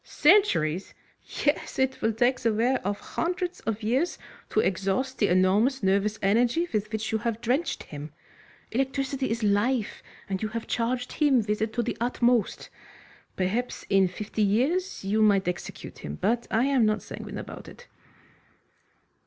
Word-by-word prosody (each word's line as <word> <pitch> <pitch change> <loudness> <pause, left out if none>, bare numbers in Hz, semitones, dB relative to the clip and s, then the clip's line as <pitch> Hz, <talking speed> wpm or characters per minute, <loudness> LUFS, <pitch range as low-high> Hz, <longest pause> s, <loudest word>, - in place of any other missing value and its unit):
"Centuries!" 185 - +3 0.5
"Yes, 290 - 0
it 265 0 0
will 225 - +2
take 245 +3 +2
the 230 -2 +1
wear 240 +5 +1
of 200 +2 -2
hundreds 360 +1 -3
of 225 0 -2
years 260 +11 0 0.3
to - - +1
exhaust 195 +7 0
the 205 - +3
enormous 200 +8 +3
nervous 200 +2 +2
energy 240 - +2
with 210 0 -1
which 220 +1 -2
you 220 - +1
have 230 0 -2
drenched 255 +8 -1
him. 150 0 -8 0.6
Electricity 270 +1 -1
is 230 0 -2
life, 210 +3 +1 0.3
and 190 -1 -3
you 215 - 0
have 230 +1 -4
charged 245 +2 -1
him 275 -6 +3
with 210 0 -1
it 220 0 0
to 240 - 0
the - - -3
utmost. 240 -2 +1 0.6
Perhaps 215 +7 -2
in 195 -1 +5
fifty 210 +4 -4
years 265 - +1
you 210 +3 +1
might 200 -3 +4
execute 180 0 -5
him, 75 - -6
but 235 +2 0
I 225 +2 +2
am 275 -4 +3
not 215 0 +1
sanguine - - -7
about - - -8
it." 485 - -13
225 Hz, 160 wpm, -27 LUFS, 205-260 Hz, 0.6 s, in